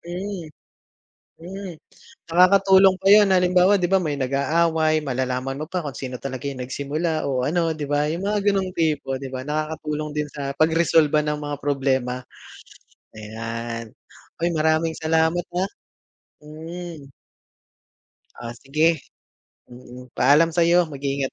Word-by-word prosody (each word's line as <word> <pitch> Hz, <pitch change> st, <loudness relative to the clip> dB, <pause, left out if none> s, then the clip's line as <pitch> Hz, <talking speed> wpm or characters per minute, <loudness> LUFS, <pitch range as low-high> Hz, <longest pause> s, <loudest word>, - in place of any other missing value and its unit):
Mm, 180 Hz, -1 st, -6 dB, 0.9 s
Mm. 185 Hz, +1 st, -8 dB, 0.6 s
Nakakatulong 190 Hz, +2 st, +5 dB
pa 195 Hz, -, +4 dB
yun 210 Hz, 0 st, +8 dB
halimbawa 180 Hz, +2 st, +4 dB
'di 180 Hz, -2 st, +1 dB
ba, 195 Hz, -, +5 dB
may 155 Hz, -5 st, -2 dB
nag-aaway, 155 Hz, +4 st, +1 dB
malalaman 130 Hz, 0 st, -2 dB
mo 155 Hz, -, -5 dB
pa 180 Hz, +2 st, -3 dB
kung 140 Hz, -5 st, -6 dB
sino 130 Hz, -1 st, -6 dB
talaga 130 Hz, +1 st, -6 dB
yung 130 Hz, -2 st, -4 dB
nagsimula 150 Hz, +5 st, -2 dB
o 130 Hz, -2 st, -1 dB
ano 165 Hz, +3 st, 0 dB
'di 150 Hz, -1 st, -5 dB
ba, 145 Hz, 0 st, +1 dB
yung 165 Hz, +5 st, -3 dB
mga 210 Hz, +1 st, 0 dB
gano'ng 195 Hz, -2 st, +1 dB
tipo 150 Hz, -6 st, -1 dB
'di 130 Hz, -1 st, -8 dB
ba, 130 Hz, -, -4 dB
nakakatulong 150 Hz, +1 st, -4 dB
din 150 Hz, -1 st, -3 dB
sa 140 Hz, -2 st, -5 dB
pagresolba 155 Hz, -1 st, +3 dB
ng 150 Hz, 0 st, -2 dB
mga 145 Hz, 0 st, -4 dB
problema. 130 Hz, -3 st, -1 dB, 0.9 s
Ayan. 115 Hz, +1 st, -6 dB, 0.5 s
Uy, 175 Hz, -, +3 dB
maraming 160 Hz, 0 st, +1 dB
salamat, 160 Hz, +2 st, +1 dB
ah. 185 Hz, +2 st, 0 dB, 0.7 s
Mm. 160 Hz, -1 st, -9 dB, 1.3 s
Oh, 120 Hz, -1 st, -6 dB
sige, 155 Hz, +4 st, +2 dB, 0.7 s
mm. 125 Hz, 0 st, -13 dB
Paalam 145 Hz, +6 st, +4 dB
sa'yo, 170 Hz, +1 st, +4 dB
mag-iingat 140 Hz, -1 st, -3 dB
155 Hz, 130 wpm, -23 LUFS, 135-170 Hz, 1.3 s, yun